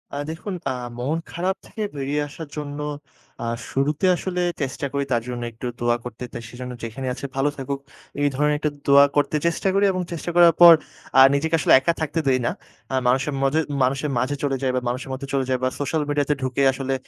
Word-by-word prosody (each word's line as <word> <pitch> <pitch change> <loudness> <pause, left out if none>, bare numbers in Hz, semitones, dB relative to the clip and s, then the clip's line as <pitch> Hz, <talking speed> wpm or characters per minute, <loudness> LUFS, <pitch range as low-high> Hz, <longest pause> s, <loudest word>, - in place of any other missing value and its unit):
আ - - -3
দেখুন 165 +5 -5 0.2
আ - - -1 0.3
মন 140 +6 -1
খারাপ 185 +3 -1
থেকে 220 - -8
বেরিয়ে 140 +1 -1
আসার 160 +2 -8
জন্য 145 -1 -5 0.6
আ - - -2 0.3
শুরুতে 145 +5 0
আসলে 180 0 -3 0.2
চেষ্টা 135 0 -2
করি 140 0 0
তার 120 -2 +2
জন্য 120 -1 -4
একটু 115 +2 -6
দোয়া 120 0 +2
করতে। 120 0 -7
তো - - -4
সে - - -14 0.3
যেখানে 130 +4 -5
আছে 130 +2 -7
ভালো 135 +2 +2
থাকুক 135 0 -3 0.4
এই 145 - +4
ধরনের 150 +2 +2
একটা 150 - 0 0.2
দোয়া 140 0 +8
করতে 145 +1 +2
চেষ্টা 170 +3 -1
করি 200 +1 +3
এবং 185 -1 -2
চেষ্টা 170 0 -4
করার 170 -1 +7
পর 170 -1 +12 0.5
আ - - +10
নিজেকে 160 +3 +1
আসলে - - +4
একা 150 +6 +1
থাকতে 160 +1 -1
দেই 130 -1 +3
না। - - +1 0.4
আ - - +2
মানুষের 135 +4 +2
মজে 135 +3 +2 0.2
মানুষের 135 +3 0
মাঝে 130 +4 0
চলে 140 -2 +1
যাই 130 -1 +1
বা 125 - 0
মানুষের 130 +2 -4
মধ্যে 135 +1 -6
চলে 135 -1 +1
যাই 130 - +2
বা 130 - +3
social 150 +2 0
media 145 0 +1
তে - - +5
ঢুকে 130 +1 -1
আসলে 135 0 -2
140 Hz, 215 wpm, -23 LUFS, 130-155 Hz, 0.6 s, পর